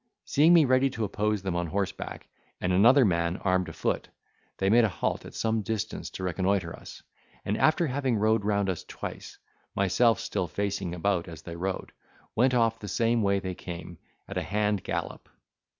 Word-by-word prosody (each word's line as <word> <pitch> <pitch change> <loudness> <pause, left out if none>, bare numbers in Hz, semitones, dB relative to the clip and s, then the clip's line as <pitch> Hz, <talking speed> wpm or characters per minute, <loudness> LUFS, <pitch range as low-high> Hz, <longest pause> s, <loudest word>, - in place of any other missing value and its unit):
Seeing 155 +4 +4
me 160 -3 +6
ready 130 +1 +3
to 115 -3 -4
oppose 105 0 -1
them 95 -2 -2
on 85 0 -1
horseback, 95 +3 -4 0.3
and 90 0 0
another 120 +8 +6
man 85 -1 +1
armed 90 -1 0
a - - -8
foot, - - -2 0.5
they 95 - 0
made 115 +4 +5
a 110 - +3
halt - - -2
at - - -11
some 110 -1 0
distance 105 0 -3
to - - -7
reconnoitre 90 -1 0
us: - - -12 0.4
and 105 - 0
after 155 +7 +3
having 135 -3 0
rode 110 0 +2
round 100 -1 +1
us 95 -3 -2
twice, - - -8 0.4
myself 105 +4 +3
still 90 - -2
facing 100 -3 -2
about 90 0 0
as 80 -2 -10
they 85 - -7
rode, 95 +2 -3 0.4
went 125 +2 +3
off 115 -1 +2
the 105 - -7
same 115 +3 +1
way 100 -1 +2
they 95 -1 -3
came, 85 -1 -8 0.3
at - - -3
a - - -3
hand 105 -1 0
gallop. - - -4
100 Hz, 185 wpm, -28 LUFS, 90-115 Hz, 0.5 s, me